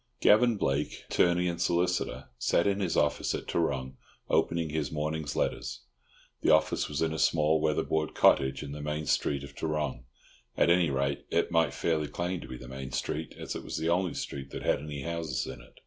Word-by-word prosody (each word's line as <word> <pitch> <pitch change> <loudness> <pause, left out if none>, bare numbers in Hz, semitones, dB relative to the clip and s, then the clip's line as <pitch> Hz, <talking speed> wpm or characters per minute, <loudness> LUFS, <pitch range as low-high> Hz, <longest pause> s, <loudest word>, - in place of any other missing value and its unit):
Gavan 110 +2 +5
Blake, 70 -5 -1
attorney 90 0 +3
and 85 -1 -2
solicitor, 90 +1 0
sat 85 +7 +2
in 100 0 +1
his 95 -4 0
office 75 - +1
at - - -6
Tarrong, 65 -5 -1 0.3
opening 85 -2 +1
his 75 -1 -2
morning's 75 -1 -2
letters. - - -2 0.6
The - - +2
office - - +3
was 75 +2 -1
in 80 -1 0
a 80 - -4
small 80 +2 +3
weatherboard 80 0 0
cottage 65 +1 +4
in 70 - -7
the 75 +1 -6
"main 75 +1 -3
street" 70 -1 +1
of 70 0 -10
Tarrong 75 -6 -2 0.5
(at 85 - +4
any 85 -2 +4
rate 70 0 -1
it - - +1
might 80 -4 +2
fairly 80 -3 0
claim 85 +4 -3
to - - -9
be 65 - -7
the 65 - -11
main 65 +1 -7
street, 80 +4 -3
as - - -5
it - - -5
was - - -4
the 80 +1 0
only 90 +1 +1
street 70 -1 -5
that - - -6
had - - +2
any 75 -2 -6
houses 80 -5 -2
in 65 -2 -8
it). 65 - -18
75 Hz, 200 wpm, -29 LUFS, 70-85 Hz, 0.6 s, Gavan